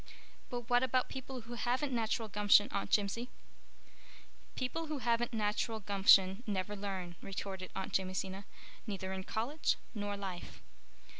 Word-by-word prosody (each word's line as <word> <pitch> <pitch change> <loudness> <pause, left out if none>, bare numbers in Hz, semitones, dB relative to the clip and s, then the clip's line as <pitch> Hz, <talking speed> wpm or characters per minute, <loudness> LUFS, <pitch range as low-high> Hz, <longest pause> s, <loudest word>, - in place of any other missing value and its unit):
"But 245 -1 -3
what 245 0 +4
about 255 0 +2
people 260 -1 -6
who 235 +2 -9
haven't 250 +4 0
natural 225 -1 0
gumption, 205 0 +5
Aunt 200 - -2
Jimsie?" 215 +4 +1 1.3
"People 320 +6 -2
who 305 -1 -2
haven't 240 -2 +1
natural 220 0 0
gumption 195 0 +5
never 200 0 -1
learn," 190 -4 -4
retorted 190 -1 -5
Aunt 190 - -4
Jamesina, 190 +1 -1 0.4
"neither 190 -2 -3
in 190 0 -4
college 250 +11 0 0.2
nor 205 -2 -3
life. 190 -3 -6
210 Hz, 135 wpm, -34 LUFS, 195-240 Hz, 1.3 s, gumption